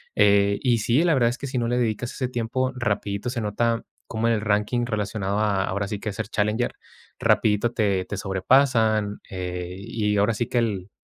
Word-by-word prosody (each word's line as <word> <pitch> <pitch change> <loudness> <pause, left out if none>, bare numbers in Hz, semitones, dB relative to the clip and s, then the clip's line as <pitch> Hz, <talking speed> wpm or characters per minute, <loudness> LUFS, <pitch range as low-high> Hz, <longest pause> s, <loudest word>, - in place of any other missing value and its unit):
Eh, 100 0 +4
y 125 -3 +3
sí, 120 +8 +2
la 170 -2 +3
verdad 120 -3 +3
es 125 - -4
que 140 - -5
si 130 - -3
no 120 -1 0
le 120 +1 0
dedicas 120 0 -1
ese 130 - -2
tiempo, 125 +2 -1
rapidito 105 -2 -2
se 120 - -3
nota 115 +2 0 0.2
como 115 +1 -1
en 115 - +3
el 105 - -2
ranking 105 +3 +1
relacionado 105 -3 -2
a, 100 -3 +1
ahora 100 +1 -2
sí 105 - -4
que, 105 -1 -4
ser 110 0 -4
challenger, 105 +3 0 0.5
rapidito 105 +2 +2
te 100 -5 +1
te - - -5
sobrepasan, 110 +1 +2
eh, 90 -1 -4
y 105 0 -1
ahora 105 +3 +3
sí 120 - -1
que, 120 - +1
el, 100 -5 -2
110 Hz, 200 wpm, -24 LUFS, 100-120 Hz, 0.5 s, Eh